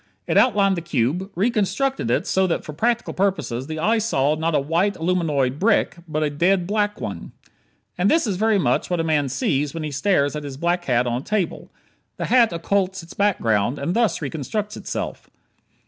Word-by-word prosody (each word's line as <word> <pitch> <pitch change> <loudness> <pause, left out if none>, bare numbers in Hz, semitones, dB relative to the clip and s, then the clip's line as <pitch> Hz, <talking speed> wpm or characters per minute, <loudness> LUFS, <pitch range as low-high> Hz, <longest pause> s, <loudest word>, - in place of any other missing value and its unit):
It - - -1
outlined 200 -6 +4
the 170 - -3
cube; 170 - -1
reconstructed 240 +6 0
it - - +1
so 190 0 +2
that 170 - -2
for 155 - -7
practical 235 +9 0
purposes 160 -10 -1
the 155 0 -5
eye 220 +8 +2
saw 150 -10 +1
not 160 +1 -1
a - - +4
white, 170 +8 0
aluminoid 155 -6 0
brick, 210 -3 +2
but 155 -1 -1
a 150 - 0
dead 175 +5 +2
black 210 +1 -1
one. - - -6 0.7
And 190 +3 +3
this 325 -2 +3
is 205 -4 -1
very 220 +1 +2
much 190 - +1
what 175 -1 0
a - - +1
man 150 -4 +1
sees 140 +3 -1
when 165 - -4
he 150 - -4
stares 145 -1 +1
at 150 - -4
his 140 -2 -7
black 175 +3 0
hat 125 -3 +2
on 120 +1 -1
a - - -15
table. 210 -2 -2 0.5
The - - -2
hat 240 -2 +4
occults 190 +2 -1
its 165 - -12
background, 120 - +1
and 140 +6 -2
thus 225 -9 +1
reconstructs 200 - -3
itself. - - -5
170 Hz, 195 wpm, -22 LUFS, 145-205 Hz, 0.7 s, outlined